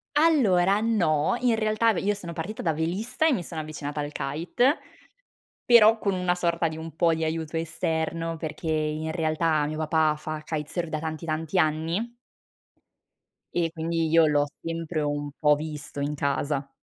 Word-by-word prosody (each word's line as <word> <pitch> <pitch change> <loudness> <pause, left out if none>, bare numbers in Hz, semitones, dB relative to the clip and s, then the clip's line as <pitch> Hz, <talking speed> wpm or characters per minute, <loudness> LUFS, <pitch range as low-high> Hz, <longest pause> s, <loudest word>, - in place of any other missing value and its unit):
Allora, 210 - +4
no, 190 -4 +2
in 240 -2 +2
realtà 220 +1 +2
ve - - -2
io 205 +1 +1
sono 175 -4 -7
partita 180 +7 -5
da 160 -2 +1
velista, 185 - -1
e 320 - +5
mi 185 -9 0
sono 160 -1 -5
avvicinata 150 -1 -5
al 145 0 -4
kite, 170 - 0 0.9
però, 225 -2 +7
con 200 -2 0
una 180 -1 +1
sorta 170 -1 0
di 160 0 -3
un 160 -1 -8
po' 165 -1 +3
di 160 - -4
aiuto 160 0 -2
esterno, 165 0 -2
perché 160 +1 -6
in 155 0 -1
realtà, 155 -2 +1
mio 155 +1 -4
papà 155 -1 +2
fa 155 0 -5
kitesurf, 160 +2 -3
da 155 0 -2
tanti, 160 +1 -5
tanti 160 +2 -2
anni 165 +9 0 1.4
e 170 -1 +1
quindi, 165 0 -1
io 165 0 +5
l'ho 145 -1 +3 0.2
sempre 165 -1 -3
un 145 0 -2
po' 150 -1 +4
visto, 150 -1 -6
in 145 +1 -1
casa. 140 0 -1
160 Hz, 165 wpm, -26 LUFS, 155-180 Hz, 1.4 s, però